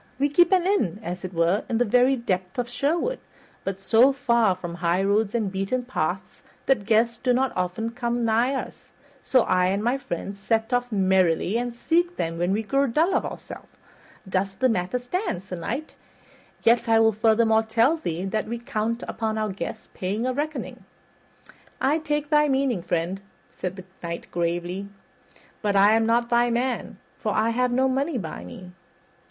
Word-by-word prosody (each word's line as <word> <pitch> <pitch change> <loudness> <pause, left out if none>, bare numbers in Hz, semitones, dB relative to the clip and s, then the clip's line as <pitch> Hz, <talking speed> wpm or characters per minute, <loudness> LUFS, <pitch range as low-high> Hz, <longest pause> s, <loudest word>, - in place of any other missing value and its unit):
We 285 +2 +2
keep 345 +5 +4
an 365 -2 +4
inn, 230 - +1
as 180 0 -5
it 185 - -5
were, 170 +3 +1
in 230 - +1
the 245 - +2
very 250 +4 +4
depths 185 -5 -3
of 245 -1 -1
Sherwood, 325 - -1 0.4
but 195 -1 -4
so 225 +7 +5
far 235 -8 +2
from 175 -2 -7
highroads 195 +5 +1
and 215 -5 0
beaten 195 +6 -2
paths 260 - -3 0.2
that 215 -7 +1
guests 230 +1 +2
do 250 -2 +2
not 260 +1 +1
often 185 +5 -2
come 240 -1 -1
nigh 235 +4 +2
us; 265 - -7 0.3
so 255 - +4
I 180 0 +2
and 195 +3 0
my 245 +4 +1
friends 200 -2 -5
set 225 +4 0
off 245 0 0
merrily 190 -2 +2
and 245 +1 -1
seek 345 +8 0
them 165 0 -3
when 175 +2 +1
we 215 +3 0
grow 275 +5 +1
dull 320 +10 +2
of - - +1
ourselves. - - -10 0.5
Thus 190 0 -1
the 255 +6 +1
matter 185 +1 0
stands, 250 - -3
Sir 185 -1 -6
Knight; 250 - -4 0.7
yet 235 0 +3
I 225 0 +5
will 225 0 +5
furthermore 220 +1 +3
tell 230 +7 +2
thee 180 - -4
that 215 +3 -2
we 235 +2 -3
count 230 0 -3
upon 220 -1 -2
our 215 -1 -1
guests 195 - -6
paying 200 +6 -2
a 255 - 0
reckoning." 300 +3 -4 1.0
"I 290 +4 +2
take 295 -1 -2
thy 300 0 +5
meaning, 265 -7 +1
friend," 175 +2 -2 0.3
said 185 0 -4
the 185 -1 -10 0.2
Knight 170 -1 -6
gravely, 175 +3 -2 0.7
"but 205 -2 0
I 200 +2 +6
am 225 0 +2
not 235 +1 +2
thy 240 0 +3
man, 245 +2 -2 0.2
for - - -1
I 220 +1 +2
have 250 +1 +1
no 260 +2 +2
money 275 +3 0
by 160 - -6
me." 180 - -10
225 Hz, 180 wpm, -25 LUFS, 190-255 Hz, 1.0 s, I